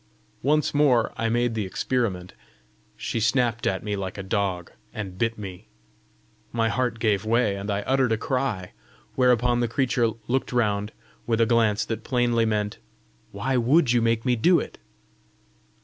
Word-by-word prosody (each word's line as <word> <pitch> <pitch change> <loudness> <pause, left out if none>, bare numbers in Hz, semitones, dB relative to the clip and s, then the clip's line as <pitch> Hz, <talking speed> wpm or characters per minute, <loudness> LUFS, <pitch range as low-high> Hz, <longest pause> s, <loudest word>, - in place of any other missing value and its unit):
Once 150 +2 +1
more 130 -7 +3
I 115 - -1
made 120 0 +1
the 110 -1 -1
experiment: 95 -5 -2 0.6
she - - -3
snapped 115 +1 +1
at 95 - -1
me 105 -1 -2
like 95 -1 -5
a 100 - -5
dog, 95 -3 -2 0.2
and 95 -4 -6
bit 115 +4 -1
me. 100 -1 -8 0.8
My 115 -1 +1
heart 125 -1 -1
gave 105 -3 +1
way, 110 -2 +1
and 100 +1 -6
I 100 0 -1
uttered 130 -1 +1
a 110 - +2
cry; 115 -7 -2 0.4
whereupon 125 -1 +3
the 120 - +1
creature 120 -1 +1 0.2
looked 130 +2 -1
round 105 -3 0 0.4
with 115 -1 +1
a 115 - +5
glance 110 -3 +2
that 115 -1 -4
plainly 120 -2 +1
meant 105 -1 -1 0.5
"Why 120 +6 -1
WOULD 125 +3 +3
you 120 -1 +3
make 115 0 +1
me 125 -1 +3
do 170 +10 +4
it?" - - -7
115 Hz, 165 wpm, -25 LUFS, 105-125 Hz, 0.8 s, a